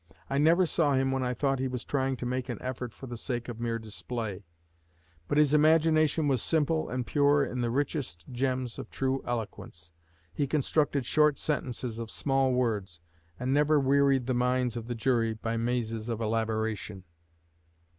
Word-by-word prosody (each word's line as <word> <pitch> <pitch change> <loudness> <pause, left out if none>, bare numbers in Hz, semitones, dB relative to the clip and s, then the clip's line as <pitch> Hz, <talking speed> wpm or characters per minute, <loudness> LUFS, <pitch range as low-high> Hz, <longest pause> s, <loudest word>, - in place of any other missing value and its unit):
I 140 - +1
never 165 +5 +5
saw 155 -4 +2
him 135 0 +1
when 135 0 0
I 125 -1 -1
thought 135 +1 0
he 130 - 0
was 125 -2 -4
trying 135 -2 0
to 125 - -5
make 125 +1 -2
an 120 - -4
effort 125 -2 -5
for 135 - -11
the 120 -2 -6
sake 120 -1 -3
of 120 -2 -6
mere 115 -1 -1
display; 110 -2 -5 0.8
but 145 - 0
his 150 -1 +4
imagination 155 0 +4
was 130 -5 +2
simple 160 0 +1
and 125 -1 -2
pure 145 0 +3
in 125 - -3
the 120 - 0
richest 130 - -2
gems 130 -1 -2
of - - -7
true 135 0 -1
eloquence. 105 -8 -5 0.4
He 140 - -1
constructed 145 -1 +1
short 150 +2 +3
sentences 125 -5 -2
of 115 -1 -5
small 135 0 +1
words, 105 -9 -1 0.4
and 130 +2 0
never 150 +1 +4
wearied 135 -1 +3
the 130 - 0
minds 125 0 +1
of 115 -1 -5
the 120 - -3
jury 115 -1 +1
by 115 +1 -3
mazes 115 -1 -2
of 115 -2 -2
elaboration." 110 -3 -2
125 Hz, 175 wpm, -29 LUFS, 115-140 Hz, 0.8 s, never